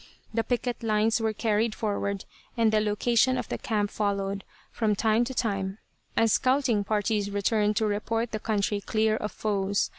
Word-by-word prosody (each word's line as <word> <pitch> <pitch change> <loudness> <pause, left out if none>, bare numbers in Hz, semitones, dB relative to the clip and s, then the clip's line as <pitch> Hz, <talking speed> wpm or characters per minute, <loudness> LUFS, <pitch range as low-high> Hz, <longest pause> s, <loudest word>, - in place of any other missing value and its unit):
The 225 0 +1
picket 245 0 -2
lines 220 0 +2
were 220 0 +1
carried 215 0 0
forward 200 -2 -2 0.3
and 225 -2 +4
the 215 - +3
location 235 +4 +2
of - - -4
the - - -3
camp 210 -3 -1
followed, 200 -1 -1 0.3
from 215 -3 +1
time 220 +3 +2
to 260 +1 -5
time, 195 -4 -1 0.4
as 225 -2 +4
scouting 255 -5 +2
parties 210 0 0
returned 210 +1 +1
to 220 - +1
report 225 +2 -1
the 215 - -2
country 205 -1 0
clear 215 +1 +1
of 210 - -3
foes. 200 -2 0
215 Hz, 170 wpm, -27 LUFS, 205-225 Hz, 0.4 s, and